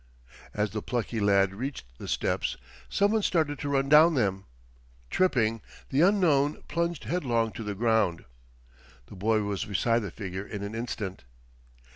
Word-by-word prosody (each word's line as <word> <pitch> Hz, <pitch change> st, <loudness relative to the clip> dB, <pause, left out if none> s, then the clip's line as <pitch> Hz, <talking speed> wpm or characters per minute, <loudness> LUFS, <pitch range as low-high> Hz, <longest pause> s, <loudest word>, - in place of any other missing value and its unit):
As 105 Hz, -1 st, 0 dB
the 110 Hz, +1 st, -3 dB
plucky 120 Hz, -1 st, -2 dB
lad 100 Hz, -2 st, +3 dB
reached 130 Hz, -, -5 dB
the -, -, -7 dB
steps -, -, -1 dB, 0.3 s
some 200 Hz, +1 st, +2 dB
one 220 Hz, 0 st, +2 dB
started 155 Hz, -7 st, 0 dB
to 145 Hz, -, -3 dB
run 135 Hz, -1 st, +1 dB
down 155 Hz, +3 st, +7 dB
them. 95 Hz, -6 st, 0 dB, 0.7 s
Tripping, 115 Hz, -11 st, +2 dB, 0.3 s
the 140 Hz, +2 st, +2 dB
unknown 165 Hz, -7 st, +3 dB
plunged 170 Hz, -3 st, -2 dB
headlong 120 Hz, -5 st, 0 dB
to 115 Hz, -, -7 dB
the 105 Hz, -1 st, -4 dB
ground. 110 Hz, -6 st, +1 dB, 0.8 s
The -, -, -12 dB
boy 110 Hz, +3 st, +1 dB
was 100 Hz, -2 st, -2 dB
beside 115 Hz, +3 st, +1 dB
the 105 Hz, -4 st, -4 dB
figure 95 Hz, +1 st, -6 dB
in 100 Hz, -1 st, -6 dB
an 100 Hz, +1 st, -5 dB
instant. 115 Hz, -4 st, -5 dB
115 Hz, 155 wpm, -28 LUFS, 100-145 Hz, 0.8 s, down